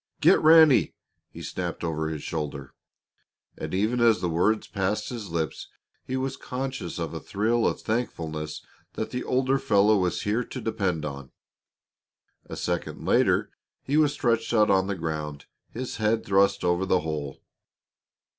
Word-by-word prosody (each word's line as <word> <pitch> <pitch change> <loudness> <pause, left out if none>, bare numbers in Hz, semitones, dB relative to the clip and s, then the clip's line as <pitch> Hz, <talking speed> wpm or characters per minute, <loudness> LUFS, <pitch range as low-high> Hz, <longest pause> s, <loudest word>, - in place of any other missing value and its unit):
"Get - - +5
Ranny!" 155 -3 +6 0.3
he - - -10
snapped - - -4
over 80 -2 -1
his 80 -2 -5
shoulder. 75 -4 -5 0.8
And - - -6
even 110 +6 0
as 115 -2 +4
the 90 - -1
words 105 +7 +2
passed 100 +1 -2
his 115 -5 -6
lips 80 -2 -3 0.4
he 130 - -3
was 130 0 -2
conscious 130 +1 -5
of - - -4
a - - -4
thrill 115 +4 0
of - - -2
thankfulness 80 -10 -3 0.3
that - - -4
the 125 - -3
older 130 +1 +1
fellow 105 -5 +4
was 90 -1 -1
here 110 +4 0
to 130 - -7
depend 100 -9 -1
upon. 70 -3 -7 1.2
A - - -7
second 85 -1 -3
later - - +2 0.3
he 140 - -1
was 150 -2 +4
stretched 115 -3 0
out 105 -2 +4
on 95 -1 +3
the 100 - -1
ground, 75 -4 -4 0.2
his 125 -1 -5
head 110 +1 +1
thrust 100 0 +3
over 90 +1 +1
the 95 -1 +3
hole. 75 -3 -4
100 Hz, 155 wpm, -26 LUFS, 80-120 Hz, 1.2 s, Ranny